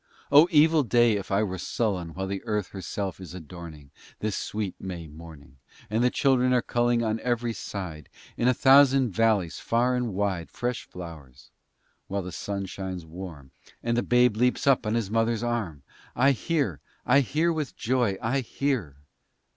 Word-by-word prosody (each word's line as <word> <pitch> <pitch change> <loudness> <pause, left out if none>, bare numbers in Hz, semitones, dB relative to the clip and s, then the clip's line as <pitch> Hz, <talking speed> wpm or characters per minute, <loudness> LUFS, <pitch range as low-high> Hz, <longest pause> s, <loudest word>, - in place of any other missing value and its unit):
Oh 145 +4 +8
evil 160 -1 +5
day! 120 -2 +3
if 100 -3 -2
I 100 +2 +2
were 95 -3 -3
sullen 90 -7 -2
While 95 +1 -3
the 95 0 -4
Earth 105 -3 -1
herself 95 0 -5
is 95 -1 -9
adorning, 80 -4 -10 0.3
This 105 -2 -2
sweet 105 -3 -3
May 90 -3 -6
morning, 75 -4 -13 0.3
And 110 +2 +1
the 125 - +4
Children 130 -1 +2
are 125 -2 +2
pulling, 120 0 +1
On 110 0 -1
every 120 -1 -1
side, 85 -9 -7 0.3
In 120 - 0
a 125 - +5
thousand 135 -2 +5
vallies 100 -4 +1
far 120 +2 +1
and 120 -5 -2
wide, 95 -4 -1
Fresh 125 0 -3
flowers; 75 -7 -11 0.6
while 100 0 -2
the 90 - -6
sun 100 +3 -4
shines 95 -2 -6
warm, 80 -5 -9 0.3
And 115 0 0
the 120 - +2
Babe 125 -3 +3
leaps 125 +2 +1
up 135 -5 +3
on 110 - 0
his 110 -4 -1
Mother's 115 0 +1
arm:— 105 - -3 0.3
I 135 +3 +4
hear, 135 - -1 0.3
I 140 +3 +5
hear, 155 +6 +1
with 155 -4 -4
joy 120 -5 0
I 125 +5 +1
hear! 125 - -2
110 Hz, 170 wpm, -26 LUFS, 90-125 Hz, 0.6 s, Oh